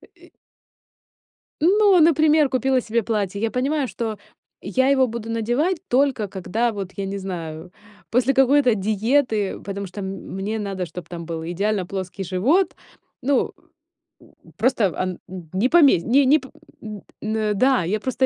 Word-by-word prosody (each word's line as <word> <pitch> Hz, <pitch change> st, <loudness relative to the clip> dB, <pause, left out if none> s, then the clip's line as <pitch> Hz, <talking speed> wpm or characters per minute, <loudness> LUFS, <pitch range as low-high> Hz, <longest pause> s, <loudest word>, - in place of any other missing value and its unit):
и -, -, -19 dB, 1.3 s
Ну, 390 Hz, +2 st, +5 dB
например, 310 Hz, -2 st, +4 dB
купила 260 Hz, 0 st, +1 dB
себе 230 Hz, 0 st, -1 dB
платье. 200 Hz, -2 st, -2 dB
Я 225 Hz, -, 0 dB
понимаю, 275 Hz, +4 st, 0 dB
что 225 Hz, -4 st, -4 dB, 0.4 s
я 260 Hz, +1 st, +1 dB
его 265 Hz, -2 st, +4 dB
буду 230 Hz, -1 st, -6 dB
надевать 240 Hz, -, 0 dB
только 255 Hz, -4 st, +2 dB
когда, 220 Hz, +5 st, -1 dB
вот 195 Hz, -3 st, -5 dB
я 200 Hz, -, -3 dB
не 200 Hz, +1 st, -4 dB
знаю, 170 Hz, -3 st, -6 dB, 0.4 s
после 250 Hz, +3 st, +2 dB
какой-то 270 Hz, -2 st, +4 dB
диеты, 215 Hz, +1 st, 0 dB
потому 200 Hz, 0 st, -5 dB
что 190 Hz, +3 st, -8 dB
м 190 Hz, -, -4 dB, 0.3 s
мне 210 Hz, +3 st, -3 dB
надо, 195 Hz, -3 st, -3 dB
чтоб 180 Hz, 0 st, -9 dB
там 170 Hz, -2 st, -7 dB
был 165 Hz, -1 st, -5 dB
идеально 200 Hz, +1 st, -1 dB
плоский 190 Hz, 0 st, -5 dB
живот. 255 Hz, -, +1 dB, 0.5 s
Ну, 275 Hz, 0 st, +1 dB, 0.7 s
м -, -, -21 dB, 0.2 s
просто 220 Hz, -, +2 dB
ан 185 Hz, -1 st, -3 dB, 0.4 s
не 200 Hz, +7 st, +2 dB
помесь 285 Hz, -, +5 dB
не 265 Hz, +7 st, +3 dB
не 290 Hz, +4 st, +6 dB
п 265 Hz, -, -13 dB, 0.3 s
м. 210 Hz, -2 st, -8 dB, 0.2 s
Н-да, 215 Hz, +2 st, +1 dB
я 210 Hz, +6 st, -1 dB
просто 260 Hz, +3 st, 0 dB
220 Hz, 150 wpm, -22 LUFS, 195-265 Hz, 1.3 s, не